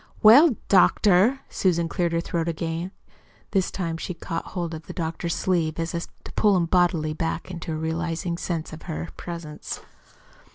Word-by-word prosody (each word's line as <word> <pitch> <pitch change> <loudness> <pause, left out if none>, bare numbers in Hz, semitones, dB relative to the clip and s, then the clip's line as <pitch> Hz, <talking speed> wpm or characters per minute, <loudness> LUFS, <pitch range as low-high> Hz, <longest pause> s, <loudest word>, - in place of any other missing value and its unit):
"Well, 250 +6 +8
doctor." 200 +6 +5
Susan 170 -3 +1
cleared 170 0 0
her 165 - +1
throat 170 -1 -2
again. 165 +1 -2 0.6
This 190 -3 +2
time 165 -3 -3
she 180 +2 -5
caught 165 0 -4
hold 170 -2 -2
of 160 0 -8
the - - -6
doctor's 165 0 -2
sleeve 165 -4 0
as 165 0 -2
if 170 0 -3 0.2
to - - -9
pull 205 -3 +3
him 170 - +2
bodily 165 -3 +2
back 165 +2 -3
to 160 - -4
a - - -2
realizing 165 +2 -2
sense 165 -3 -3
of 155 - -9
her 165 +1 -4
presence. 170 -3 -6
170 Hz, 170 wpm, -25 LUFS, 165-180 Hz, 0.6 s, Well